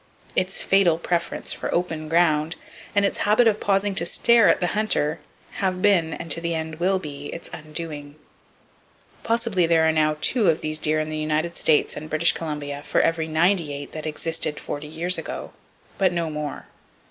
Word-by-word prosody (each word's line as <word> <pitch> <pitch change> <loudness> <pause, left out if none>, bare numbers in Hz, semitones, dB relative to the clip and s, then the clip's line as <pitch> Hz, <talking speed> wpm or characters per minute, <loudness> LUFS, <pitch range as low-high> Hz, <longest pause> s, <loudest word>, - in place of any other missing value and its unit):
Its 185 +1 0
fatal 190 -4 +4
preference 170 0 -2
for - - -4
open 160 -3 -2
ground 165 -1 +2 0.4
and 200 0 +4
its - - -1
habit 215 +3 +4
of 215 -1 +2
pausing 200 0 +1
to 190 - +1
stare 230 +5 +4
at - - +3
the 180 - 0
hunter 170 -7 0 0.4
have 185 -2 0
been, 185 -5 +3
and 165 - -6
to 165 - 0
the 170 0 -1
end 160 0 -5
will 190 +2 +2
be, 145 -5 -7
its 170 - -8
undoing. 150 -2 -7 1.1
Possibly 225 -7 +1
there 165 -1 +4
are - - +4
now 155 -1 +1
two 220 +1 +2
of 160 - +1
these 155 0 -3
deer 155 0 +1
in 155 0 -2
the 155 - -4
United 155 +2 -1
States 155 -2 +2
and 155 +1 -7
British 155 +2 +3
Columbia 145 -3 -5
for - - +1
every 165 -1 +1
98 160 -3 0
that 155 0 -5
existed 155 0 -1
forty 145 +1 -6
years 170 +4 0
ago, - - -6 0.5
but 190 -2 +3
no 170 -2 -2
more. 150 -2 -5
165 Hz, 180 wpm, -23 LUFS, 155-185 Hz, 1.1 s, fatal